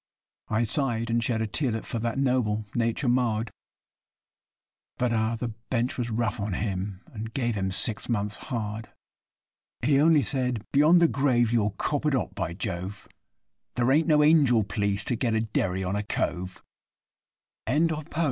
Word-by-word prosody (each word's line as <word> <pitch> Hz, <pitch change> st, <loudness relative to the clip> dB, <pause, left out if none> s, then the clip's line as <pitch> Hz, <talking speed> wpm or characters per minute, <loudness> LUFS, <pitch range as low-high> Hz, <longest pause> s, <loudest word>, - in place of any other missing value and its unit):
I 110 Hz, +2 st, +1 dB
sigh'd 115 Hz, -2 st, 0 dB
and 115 Hz, 0 st, +1 dB
shed 110 Hz, -1 st, 0 dB
a -, -, -2 dB
tearlet 115 Hz, 0 st, -2 dB
for 115 Hz, -, -3 dB
that 115 Hz, +1 st, -2 dB
noble 125 Hz, -6 st, +1 dB
nature 115 Hz, +3 st, 0 dB
marred, 120 Hz, -3 st, +1 dB, 1.5 s
But, 125 Hz, -1 st, 0 dB
ah! 110 Hz, +1 st, +1 dB
the 120 Hz, +1 st, -3 dB
Bench 115 Hz, +2 st, -3 dB
was 120 Hz, -1 st, -2 dB
rough 115 Hz, +1 st, -1 dB
on 100 Hz, -1 st, -2 dB
him, 95 Hz, -1 st, -3 dB
and 110 Hz, 0 st, -6 dB
gave 120 Hz, -3 st, 0 dB
him 95 Hz, -2 st, -2 dB
six 110 Hz, +5 st, 0 dB
months' 105 Hz, -2 st, -1 dB
hard. 110 Hz, -2 st, -4 dB, 0.9 s
He 140 Hz, +2 st, +4 dB
only 155 Hz, -2 st, +5 dB
said, 125 Hz, -5 st, -1 dB
'Beyond 155 Hz, +5 st, +5 dB
the 170 Hz, -, +6 dB
grave 120 Hz, -6 st, +2 dB
you'll 105 Hz, -3 st, +1 dB
cop 145 Hz, -1 st, -1 dB
it 145 Hz, -, +2 dB
hot, 130 Hz, -, -2 dB
by 85 Hz, 0 st, -3 dB
Jove! 95 Hz, +2 st, -5 dB, 0.7 s
There 120 Hz, +1 st, +2 dB
ain't 155 Hz, +4 st, +3 dB
no 150 Hz, -2 st, +5 dB
angel 145 Hz, -8 st, +5 dB
p'leece 100 Hz, 0 st, 0 dB
to 120 Hz, -, 0 dB
get 115 Hz, -1 st, 0 dB
a 110 Hz, -, +2 dB
derry 95 Hz, -4 st, -1 dB
on 95 Hz, +2 st, -2 dB
a 105 Hz, -, 0 dB
cove.' 95 Hz, -3 st, -3 dB, 1.1 s
RISE 160 Hz, +6 st, +2 dB
YE! 155 Hz, -1 st, -4 dB
115 Hz, 165 wpm, -26 LUFS, 105-130 Hz, 1.5 s, the